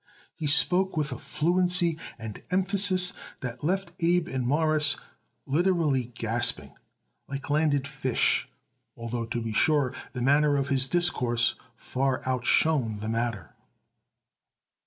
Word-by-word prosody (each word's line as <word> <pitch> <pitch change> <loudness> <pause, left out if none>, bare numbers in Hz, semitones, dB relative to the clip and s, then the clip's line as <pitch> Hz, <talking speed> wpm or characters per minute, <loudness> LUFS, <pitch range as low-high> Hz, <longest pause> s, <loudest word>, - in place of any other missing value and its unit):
He 155 - -4
spoke 180 +5 +4
with 150 -1 -1
a 125 - -6
fluency 175 +3 +1 0.2
and 110 -2 -8
emphasis 185 -1 +2 0.3
that 125 +1 -6
left 190 +5 -1
Abe 175 0 +1
and 130 -2 -3
Morris 150 +1 +3 0.5
literally 155 -4 +1
gasping 110 - +1 0.5
like 140 +1 -6
landed 145 -2 +1
fish, 135 -3 0 0.5
although, 115 0 -4
to 120 +1 -4
be 115 -1 -4
sure, 140 +1 +2 0.2
the 125 -2 -4
manner 145 +2 +3
of 140 0 -2
his 135 -1 +1
discourse 125 -9 +1 0.2
far 130 +2 -2
outshone 125 -2 +1
the 110 - -4
matter. 115 -2 -3
140 Hz, 120 wpm, -26 LUFS, 120-165 Hz, 0.5 s, spoke